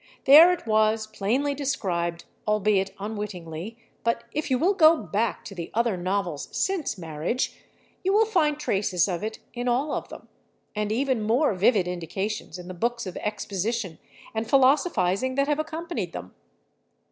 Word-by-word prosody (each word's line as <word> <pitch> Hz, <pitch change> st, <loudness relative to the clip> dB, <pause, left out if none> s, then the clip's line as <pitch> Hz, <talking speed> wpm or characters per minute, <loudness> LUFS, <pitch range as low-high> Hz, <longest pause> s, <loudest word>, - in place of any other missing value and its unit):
There 310 Hz, +6 st, +9 dB
it 360 Hz, -, -3 dB
was 215 Hz, 0 st, +2 dB
plainly 220 Hz, +7 st, -1 dB
described, 175 Hz, -12 st, -2 dB, 0.2 s
albeit 210 Hz, -2 st, +2 dB
unwittingly, 205 Hz, -2 st, -6 dB, 0.3 s
but 230 Hz, 0 st, 0 dB
if 305 Hz, +3 st, -3 dB
you 260 Hz, -, +3 dB
will 355 Hz, +9 st, +3 dB
go 330 Hz, -3 st, +6 dB
back 220 Hz, -4 st, -2 dB
to -, -, -8 dB
the 170 Hz, -3 st, -6 dB
other 235 Hz, -3 st, +2 dB
novels 180 Hz, -4 st, -2 dB
since 370 Hz, -, -1 dB
"Marriage" 165 Hz, -, -2 dB, 0.5 s
you 380 Hz, -, +2 dB
will 430 Hz, +2 st, +5 dB
find 320 Hz, -9 st, +2 dB
traces 195 Hz, -, +1 dB
of 175 Hz, -1 st, -3 dB
it 220 Hz, 0 st, -4 dB, 0.2 s
in 245 Hz, 0 st, -4 dB
all 260 Hz, +5 st, +1 dB
of -, -, -4 dB
them, -, -, -11 dB, 0.5 s
and 210 Hz, 0 st, -1 dB
even 255 Hz, 0 st, +1 dB
more 230 Hz, +5 st, +2 dB
vivid 195 Hz, 0 st, +3 dB
indications 180 Hz, +2 st, -4 dB
in 180 Hz, -1 st, -10 dB
the 185 Hz, -, -6 dB
books 235 Hz, +6 st, -2 dB
of 185 Hz, -, -6 dB
exposition 205 Hz, -2 st, -3 dB, 0.3 s
and 220 Hz, 0 st, -3 dB
philosophizing 260 Hz, -, +3 dB
that 275 Hz, +1 st, +2 dB
have 295 Hz, 0 st, +1 dB
accompanied 315 Hz, -, -4 dB
them. 90 Hz, +1 st, -8 dB
220 Hz, 160 wpm, -26 LUFS, 190-275 Hz, 0.5 s, There